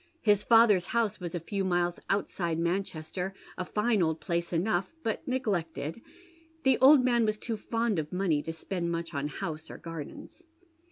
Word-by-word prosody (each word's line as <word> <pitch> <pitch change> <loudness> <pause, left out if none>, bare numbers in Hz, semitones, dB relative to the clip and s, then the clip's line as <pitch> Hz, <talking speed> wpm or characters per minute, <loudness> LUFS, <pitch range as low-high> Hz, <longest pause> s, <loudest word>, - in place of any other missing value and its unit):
His 210 -2 +4
father's 220 -6 +5
house 230 -3 0
was 175 -1 -5
a - - -1
few 195 +4 -3
miles 175 -1 0
outside 170 -4 0
Manchester, 180 +1 -2 0.2
a 185 - -3
fine 210 +2 +1
old 160 -1 +1
place 170 -1 -2
enough, 180 - 0
but 225 - -2
neglected, 195 - -2 0.3
— 325 -1 -31
the 265 -1 +4
old 265 0 +7
man 240 -2 +3
was 215 -1 +1
too 230 +1 -3
fond 225 -2 -1
of 150 -1 -4
money 180 -5 +1
to 165 - -4
spend 170 +1 -3
mucii 170 0 -3
on 140 0 -1
house 155 +2 -5
or - - -8
gardens. 165 - -8
185 Hz, 175 wpm, -29 LUFS, 170-225 Hz, 0.3 s, old